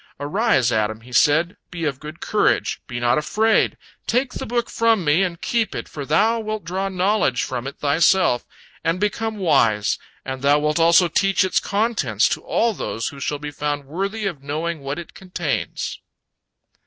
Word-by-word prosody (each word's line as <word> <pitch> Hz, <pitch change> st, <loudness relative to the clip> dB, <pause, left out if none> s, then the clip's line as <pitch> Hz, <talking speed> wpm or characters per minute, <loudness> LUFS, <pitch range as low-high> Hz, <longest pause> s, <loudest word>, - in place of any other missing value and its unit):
"Arise, 145 Hz, -, +2 dB
Adam," 110 Hz, 0 st, 0 dB
he 125 Hz, +2 st, -14 dB
said, 160 Hz, +7 st, +3 dB
"be 170 Hz, -2 st, -4 dB
of 140 Hz, -3 st, -2 dB
good 155 Hz, +2 st, -9 dB
courage, -, -, +1 dB
be 120 Hz, -, -4 dB
not 120 Hz, +3 st, +2 dB
afraid, 215 Hz, +8 st, +2 dB, 0.3 s
take 250 Hz, +2 st, +1 dB
the -, -, -5 dB
book 240 Hz, 0 st, 0 dB
from 225 Hz, -5 st, +2 dB
me 150 Hz, +5 st, +4 dB
and 180 Hz, -3 st, -2 dB
keep 230 Hz, -4 st, 0 dB
it, -, -, -5 dB
for 140 Hz, -3 st, -7 dB
thou 220 Hz, +9 st, +3 dB
wilt 215 Hz, -1 st, -4 dB
draw 190 Hz, +4 st, -2 dB
knowledge 185 Hz, -8 st, +1 dB
from 130 Hz, 0 st, -4 dB
it 140 Hz, -, -7 dB
thyself 155 Hz, -1 st, +3 dB, 0.4 s
and 165 Hz, +2 st, 0 dB
become 220 Hz, +2 st, -1 dB
wise, 115 Hz, -, +2 dB, 0.3 s
and 130 Hz, -1 st, -5 dB
thou 140 Hz, +1 st, +4 dB
wilt 150 Hz, +2 st, 0 dB
also 170 Hz, +2 st, +6 dB
teach 195 Hz, +3 st, +2 dB
its 185 Hz, -, +2 dB
contents 200 Hz, -, +1 dB
to -, -, -2 dB
all 230 Hz, -1 st, +1 dB
those 115 Hz, -, -3 dB
who 140 Hz, -, -11 dB
shall 145 Hz, +2 st, -2 dB
be 145 Hz, 0 st, -6 dB
found 145 Hz, 0 st, -3 dB
worthy 195 Hz, +8 st, -3 dB
of 175 Hz, -8 st, -3 dB
knowing 155 Hz, +4 st, -3 dB
what 140 Hz, +1 st, -4 dB
it 170 Hz, -2 st, -8 dB
contains." 180 Hz, -5 st, -3 dB
165 Hz, 180 wpm, -22 LUFS, 140-200 Hz, 0.4 s, also